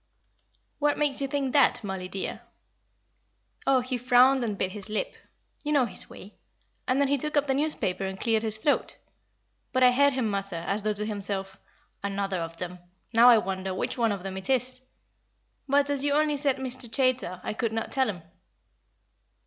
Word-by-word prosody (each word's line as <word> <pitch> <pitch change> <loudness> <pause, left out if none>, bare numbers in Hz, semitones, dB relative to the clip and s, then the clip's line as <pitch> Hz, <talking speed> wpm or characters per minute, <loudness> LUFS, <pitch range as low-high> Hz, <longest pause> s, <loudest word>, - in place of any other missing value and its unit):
"What 295 0 +2
makes 290 -2 0
you 275 - 0
think 270 -1 -2
that, 280 -4 +4
Mollie, 190 -2 -4
dear." 190 +1 -4 1.3
"Oh, 265 -2 +4
he 250 0 -3
frowned 255 +1 +5
and 210 -4 -2
bit 190 - -1
his 205 +1 -7
lip. 215 - -2 0.5
You 300 - -2
know 275 -4 +4
his 220 - -1
way. 200 - -13 0.5
And 255 +2 +2
then 280 - +3
he 280 0 +1
took 300 +3 -2
up 290 - +3
the 270 - +1
newspaper 275 -10 -1
and 190 0 -6
cleared 225 -2 +1
his 220 -1 +1
throat. 285 +7 0 0.7
But 255 0 +2
I 250 - +7
heard 280 +2 +4
him 255 -3 0
mutter, 195 -2 -3
as 205 +2 0
though 215 +1 0
to 210 +1 -2
himself, 195 -2 -2 0.4
'Another 195 -2 -2
of 165 0 -6
them. 180 0 -6 0.3
Now 235 +2 +8
I 235 - +8
wonder 190 -2 -2
which 215 - -3
of 205 -5 0
them 190 -1 -5
it 190 +7 -7
is.' 255 0 0 0.9
But, 285 +1 +3
as 280 -1 0
you 285 0 +1
only 300 0 +2
said 280 -2 +1
Mr. 260 -2 -2
Chaytor, 255 -7 +1
I - - -3
could 225 0 -2
not 225 0 -3
tell 265 -2 +1
him." 180 -5 -6
240 Hz, 190 wpm, -27 LUFS, 195-270 Hz, 1.3 s, Now